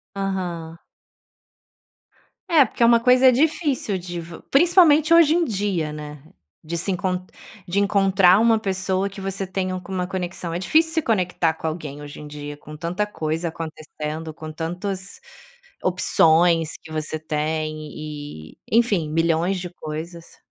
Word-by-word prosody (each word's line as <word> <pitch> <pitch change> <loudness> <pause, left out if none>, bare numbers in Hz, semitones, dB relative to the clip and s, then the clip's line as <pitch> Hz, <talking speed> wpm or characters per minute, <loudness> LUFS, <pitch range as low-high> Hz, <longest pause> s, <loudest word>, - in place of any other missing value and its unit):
Aham. 175 -4 -3 1.7
É 305 -6 +6
porque 235 - -2
é - - +7
uma 235 0 +6
coisa 255 +2 +6
difícil 285 - +1
de 175 -1 -6
vo 165 0 -10
principalmente, 325 0 +5
hoje 330 -2 +6
em 340 -1 +2
dia, 190 -8 -1
né, 150 -1 -8 0.4
de 170 +2 -4
se 185 +4 0
enc 180 - -3 0.7
de 190 +3 0
encontrar 195 -2 +4
uma 225 0 +4
pessoa 190 -1 -1
que 195 0 -10
você 195 0 -3
tenha 185 -1 -2
alguma 185 0 -4
conexão. 180 -2 -4
É 175 - -2
difícil 320 - +2
se 320 - +2
conectar 180 - +1
com 160 - -5
alguém 150 -3 -5
hoje 145 0 -9
em 150 - -9
dia, 145 0 -8
com 150 +1 -11
tanta 170 +6 -2
coisa 165 -4 -3
acontecendo, 155 -1 -6
com 155 0 -8
tantas 185 - -5 0.6
opções 165 -2 +3
que 160 - -12
você 155 0 -2
tem 155 0 -2 0.2
e, 145 - -8
enfim, 210 -9 +2
milhões 165 +3 +1
de 180 0 -5
coisas. 165 +2 -8
180 Hz, 145 wpm, -22 LUFS, 160-200 Hz, 1.7 s, é